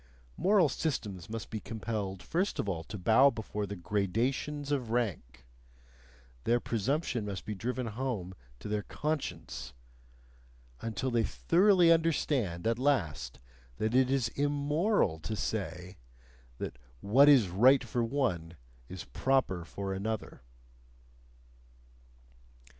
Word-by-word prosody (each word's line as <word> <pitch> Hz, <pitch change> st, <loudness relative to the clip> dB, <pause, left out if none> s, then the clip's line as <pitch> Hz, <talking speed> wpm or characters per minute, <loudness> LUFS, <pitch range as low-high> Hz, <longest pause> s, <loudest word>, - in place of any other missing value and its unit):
Moral 190 Hz, -3 st, +4 dB
systems 105 Hz, -, -3 dB
must 115 Hz, 0 st, -6 dB
be 110 Hz, -, -3 dB
compelled 100 Hz, -2 st, -4 dB
first 185 Hz, +5 st, -1 dB
of -, -, -2 dB
all 85 Hz, -4 st, -2 dB
to 105 Hz, -, -7 dB
bow 115 Hz, +8 st, +5 dB
before 105 Hz, -4 st, -4 dB
the 100 Hz, -, -5 dB
GRADATIONS 115 Hz, +10 st, -1 dB
OF 130 Hz, -5 st, -1 dB
RANK; 75 Hz, -, -2 dB, 1.0 s
their 120 Hz, +1 st, +3 dB
presumption 120 Hz, +2 st, -1 dB
must 100 Hz, -3 st, -5 dB
be 105 Hz, -, -3 dB
driven 125 Hz, +5 st, -3 dB
home 110 Hz, -5 st, -3 dB, 0.2 s
to -, -, -8 dB
their 105 Hz, 0 st, -1 dB
conscience 85 Hz, -, -4 dB, 1.1 s
until 115 Hz, +3 st, -2 dB
they 120 Hz, -1 st, +2 dB
thoroughly 180 Hz, -, +4 dB
understand 145 Hz, -, +1 dB
at 115 Hz, +1 st, +1 dB
last 80 Hz, -, 0 dB, 0.4 s
that 110 Hz, +1 st, -1 dB
it 130 Hz, 0 st, +4 dB
is 130 Hz, -3 st, +1 dB
IMMORAL 145 Hz, -, +1 dB
to 95 Hz, +8 st, -4 dB
say 95 Hz, -3 st, -4 dB, 0.6 s
that -, -, -6 dB, 0.2 s
'what 135 Hz, +8 st, +6 dB
is 125 Hz, -10 st, +6 dB
right 125 Hz, +9 st, +5 dB
for 120 Hz, 0 st, -1 dB
one 90 Hz, -, -1 dB, 0.3 s
is 95 Hz, -1 st, -6 dB
proper 130 Hz, -10 st, 0 dB
for 95 Hz, +3 st, -5 dB
another.'" 105 Hz, -2 st, -4 dB
115 Hz, 120 wpm, -31 LUFS, 95-135 Hz, 1.1 s, what